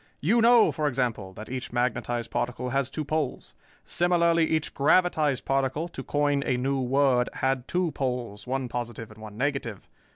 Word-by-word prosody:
You 220 +10 +3
know, 235 0 +6
for 155 -2 -1
example, 120 -8 -1
that 110 +3 -9
each 130 0 -5
magnetized 120 -1 -1
particle 125 +1 -2
has 135 0 0
two 155 - -4
poles. 155 -2 -2 0.3
Similarly 170 -1 +2
each 160 -1 -1
gravitized 150 -2 +2
particle, 135 +4 0
to 135 - -7
coin 145 0 +1
a 125 - 0
new 135 +2 0
word, 130 -1 +2
had 130 -1 -1
two 180 -2 0
poles, 125 -7 -4
one 130 0 -1
positive 120 -2 -5
and 110 0 -14
one 105 -1 -10
negative. 130 -6 -2
135 Hz, 165 wpm, -27 LUFS, 120-150 Hz, 0.3 s, know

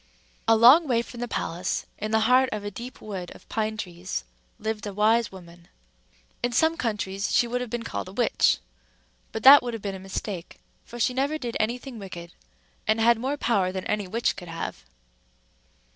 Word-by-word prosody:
A 225 - +6
long 255 +9 +7
way 235 -3 +2
from 240 - -11
the 245 - -3
palace, 175 -4 -2
in 215 - -3
the 220 0 +2
heart 255 +3 +4
of 215 -1 -4
a 205 - -4
deep 240 +6 -9
wood 190 -4 -6
of - - -17
pine 220 -1 -1
trees, 180 - -5 0.3
lived 220 -1 -3
a 200 - -6
wise 220 +2 +3
woman. 175 -2 -13 0.7
In 245 - 0
some 320 +6 +3
countries 205 - -2
she - - +4
would 245 +1 -2
have 250 - -4
been 240 0 -3
called 230 - -4
a - - -9
witch; 235 +5 +2 0.7
but 220 - -5
that 280 +2 +10
would 240 -2 -4
have 225 - -8
been 200 -1 -3
a 190 - -7
mistake, 190 -1 -6 0.3
for 240 - -9
she 250 +2 +2
never 280 +4 0
did 240 -6 -5
any 230 +3 +1
thing 250 -2 -9
wicked, 175 -3 -9 0.5
and 215 +1 +3
had 230 0 +4
more 270 +4 -2
power 200 -8 +1
than 190 0 -5
any 210 -2 -1
witch 230 +5 0
could 175 - -9
have. 165 0 -5
220 Hz, 200 wpm, -26 LUFS, 195-240 Hz, 0.7 s, that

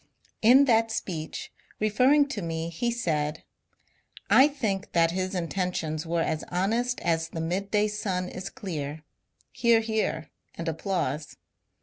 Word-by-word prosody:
In 255 +5 +7
that 225 -3 +3
speech, 165 -7 -4 0.3
referring 255 +8 +4
to 235 -7 -3
me 165 -1 -3
he 205 +9 -1
said: 160 -9 -1 0.4
— - - -23
I 275 - +8
think 220 -10 -3
that 165 -1 +4
his 185 +1 -2
intentions 170 -3 -2
were 165 0 +1
as 155 - -2
honest 230 +7 0
as 165 -1 0
the 165 - -6
midday 200 +5 0
sun 195 -4 -2
is 185 +1 -6
clear. 155 -5 -5 0.5
(Hear, 235 -1 +4
hear, 220 -8 -2 0.2
and 170 - -5
applause.) 160 -3 -2
185 Hz, 135 wpm, -27 LUFS, 165-220 Hz, 0.5 s, I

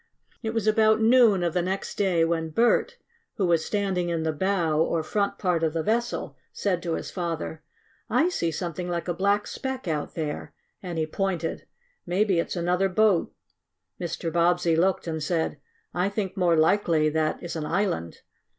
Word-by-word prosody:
It 225 -1 -3
was 225 -2 0
about 220 0 +4
noon 225 -4 +5
of 170 -2 0
the 180 - +1
next 190 +2 -3
day 180 -5 +2
when 165 -1 -1
Bert, 235 +9 +2 0.4
who 200 - 0
was 170 -2 +2
standing 190 -4 -1
in 165 -1 -1
the 160 - +1
bow, 170 -3 +1
or 160 0 +1
front 200 +5 -1
part 180 -4 0
of 160 -2 +1
the 165 -1 -1
vessel, 230 -9 -1 0.2
said 185 -4 -1
to 170 -2 -2
his - - -5
father: 165 -3 -4 0.5
"I 335 - +3
see 170 - -1
something 175 +2 -4
like 170 -1 -3
a 175 - 0
black 200 +4 +1
speck 265 -5 -5
out 155 -3 -2
there," 155 -3 -4 0.3
and 175 -3 -5
he 160 - +1
pointed. 170 0 -3 0.4
"Maybe 190 0 +2
it's 170 - -2
another 180 +2 +1
boat." 200 -2 +2 0.7
Mr. 170 -2 -3
Bobbsey 175 0 +3
looked 185 +3 +1
and 160 -2 -3
said: 160 -2 -1 0.3
"I 180 +2 +1
think 200 -2 -3
more 175 -4 +3
likely 160 -2 +3
that 155 0 0
is 175 - -5
an 155 -2 -3
island. 185 - -1
175 Hz, 180 wpm, -26 LUFS, 165-200 Hz, 0.7 s, noon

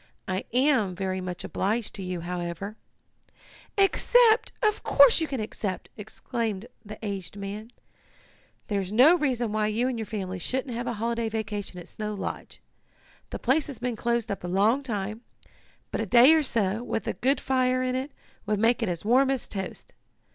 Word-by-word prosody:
I 185 +1 -2
am 250 -7 +2
very 190 0 -2
much 180 -1 -5
obliged 215 +3 -1
to 200 - -7
you, 180 -2 -4
however 175 +3 -4 0.5
" - - -25
"Accept! 480 -2 +4
Of 425 0 +2
course 280 +2 +6
you 320 - 0
can 270 -4 -3
accept!" 210 -3 -4
exclaimed 220 -1 -4 0.2
the 215 0 -9
aged 195 -1 -4
man. 205 +3 -6 1.0
"There's 200 -4 -2
no 255 +10 +7
reason 250 -8 0
why 215 0 +1
you 225 +4 0
and 250 -3 -2
your 220 - -4
family 190 -4 -4
shouldn't 255 +6 -2
have 240 +1 -4
a 240 - -1
holiday 230 +1 -1
vacation 205 -4 -4
at 175 - -10
Snow 210 -1 -5
Lodge. 195 - -6 0.7
The - - -5
place 275 +5 +1
has 280 -5 -7
been 245 -1 -2
closed 235 0 -1
up 200 - -4
a - - -3
long 205 +9 +3
time, 215 -3 -4 0.7
but - - -1
a 225 - -3
day 245 - +8
or 320 - +4
so, 225 -6 +1
with 240 - -3
a - - 0
good 265 +2 +1
fire 255 -1 +1
in 255 0 -1
it, 260 +3 -3 0.4
would 210 0 +1
make 230 +3 +2
it 225 - 0
as 175 +2 -4
warm 260 +4 +4
as 270 -3 -1
toast. 195 -2 -6
220 Hz, 185 wpm, -27 LUFS, 200-255 Hz, 1.0 s, day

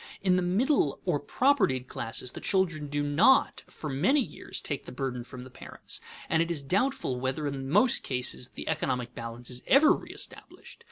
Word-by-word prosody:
In 185 -2 +4
the 180 - +2
middle 185 - +2
or 175 -6 +1
propertied 190 - +2
classes 120 +2 -3
the - - -9
children 170 -6 0
do 145 0 -1
not 150 - +4
for 155 - -8
many 160 - +3
years 255 - -4
take 140 -3 -4
the - - -7
burden 125 -2 -3
from 125 +1 -9
the 130 - -12
parents, - - -6 0.3
and 160 0 +2
it 165 - 0
is 160 -5 -1
doubtful 185 - 0
whether 130 +4 -2
in 135 -2 -3
most 210 - +3
cases 125 -1 -1
the - - -9
economic 125 -6 -1
balance 115 +1 -6
is 125 0 -4
ever 295 +3 +7
reëstablished. - - -5
145 Hz, 180 wpm, -29 LUFS, 125-185 Hz, 0.3 s, ever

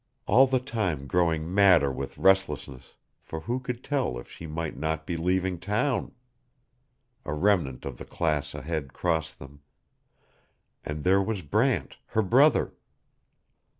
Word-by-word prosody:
All 130 +6 +6
the 130 0 +2
time 105 - -2
growing 85 +1 0
madder 90 -8 +5
with 65 0 -6
restlessness, 75 -9 +1 0.3
for 80 - -7
who 120 +10 -2
could 125 -1 -5
tell 135 - -1
if - - -10
she 80 - -9
might 80 +1 -4
not 80 +3 -2
be 85 - -3
leaving 90 +1 0
town! 105 - -1 1.1
A 75 - -3
remnant 85 -7 +1
of 65 -3 -6
the - - -7
class 75 -3 -1
ahead 75 -1 -4
crossed 80 -3 -1
them 70 +1 -13 1.2
and 75 0 -5
there 95 +2 +4
was 95 -2 -3
Brant, 70 - 0
her 110 - +1
brother. 135 +9 +4
85 Hz, 140 wpm, -27 LUFS, 75-100 Hz, 1.2 s, All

